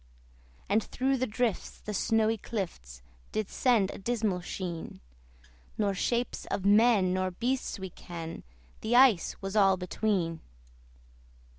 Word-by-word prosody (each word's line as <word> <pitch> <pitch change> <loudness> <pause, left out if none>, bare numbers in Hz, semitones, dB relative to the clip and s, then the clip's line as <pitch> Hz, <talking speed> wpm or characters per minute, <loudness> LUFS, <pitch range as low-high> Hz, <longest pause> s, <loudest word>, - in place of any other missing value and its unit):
And 210 +3 +2
through 265 +1 0
the 255 +1 0
drifts 225 -1 -2
the 210 - -6
snowy 220 +2 +2
clifts 65 - -6 0.3
Did 215 -2 -2
send 225 -7 +2
a - - -9
dismal 210 -4 -1
sheen: 175 -2 -5 0.8
Nor 205 -2 +1
shapes 235 +5 -1
of 195 - -3
men 205 -3 +5
nor 185 0 0
beasts 245 +9 -2
we 190 -2 -6
ken 165 -1 -7 0.4
The 230 +2 0
ice 245 -8 +5
was 195 +1 -4
all 195 -2 +5
between. 180 -3 -1
205 Hz, 130 wpm, -29 LUFS, 185-225 Hz, 0.8 s, men